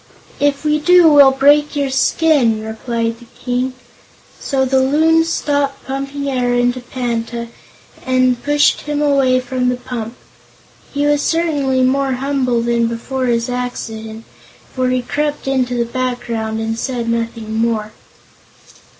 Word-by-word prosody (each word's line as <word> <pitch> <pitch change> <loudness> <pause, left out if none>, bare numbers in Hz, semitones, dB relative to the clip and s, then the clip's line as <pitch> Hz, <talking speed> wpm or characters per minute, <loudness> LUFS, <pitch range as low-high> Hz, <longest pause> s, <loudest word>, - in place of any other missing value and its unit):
"If 285 +1 0
we 300 0 +2
do 355 +2 +6
we'll 285 -2 +8
break 290 +3 +3
your 280 -2 -1
skin," 260 -4 +2
replied 230 +1 -3
the 240 - -15
King. 250 +1 -2 0.7
So 265 -2 0
the 265 0 +2
Loons 320 +4 +3
stopped 285 -3 -1
pumping 275 +1 -4
air 250 -2 0
into 245 +1 +1
Panta, 235 -1 -4 0.5
and 255 -1 +1
pushed 290 0 +2
him 295 0 -3
away 275 -3 +3
from 255 0 -1
the 250 - 0
pump. 245 -2 -6 0.8
He 285 0 -1
was 290 0 +2
certainly 290 -6 +1
more 270 +1 +1
humble 255 -3 0
than 235 -1 +1
before 255 +3 -3
his 235 0 0
accident, 225 -3 -5 0.5
for 255 -1 0
he 255 -1 0
crept 295 +2 -3
into 255 -2 0
the 235 -1 0
background 235 -3 -3
and 225 0 -3
said 245 -3 -3
nothing 230 -1 -3
more. 220 -1 -1
255 Hz, 140 wpm, -17 LUFS, 235-280 Hz, 0.8 s, we'll